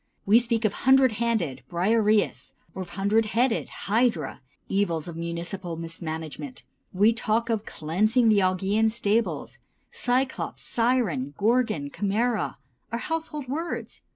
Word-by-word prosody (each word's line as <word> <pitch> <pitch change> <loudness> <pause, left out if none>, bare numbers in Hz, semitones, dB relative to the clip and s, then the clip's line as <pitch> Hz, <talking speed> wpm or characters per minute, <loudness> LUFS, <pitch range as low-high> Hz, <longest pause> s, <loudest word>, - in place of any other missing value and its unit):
We 215 +4 +6
speak 235 -2 0
of 215 - +2
"hundred 265 -1 +5
handed" 195 - 0
(Briareus) 210 +4 +1 0.2
or 190 - -4
"hundred 200 +5 +1
headed" 245 -1 +2 0.2
(Hydra) 220 -4 +1 0.3
evils 175 -5 0
of 170 - -6
municipal 170 +2 -4
mismanagement; 165 - -6 0.3
we 210 +4 +4
talk 230 +1 0
of 220 -2 -2
"cleansing 215 +10 +1
the 210 -2 +5
Augean 190 +4 +2
stables"; 220 0 -1 0.3
Cyclops, 255 +2 -1
Siren, 220 - 0
Gorgon, 215 - +1
Chimæra, 210 - 0 0.4
are 230 - -1
household 305 0 -4
words. 320 +6 -4
215 Hz, 120 wpm, -26 LUFS, 175-235 Hz, 0.4 s, We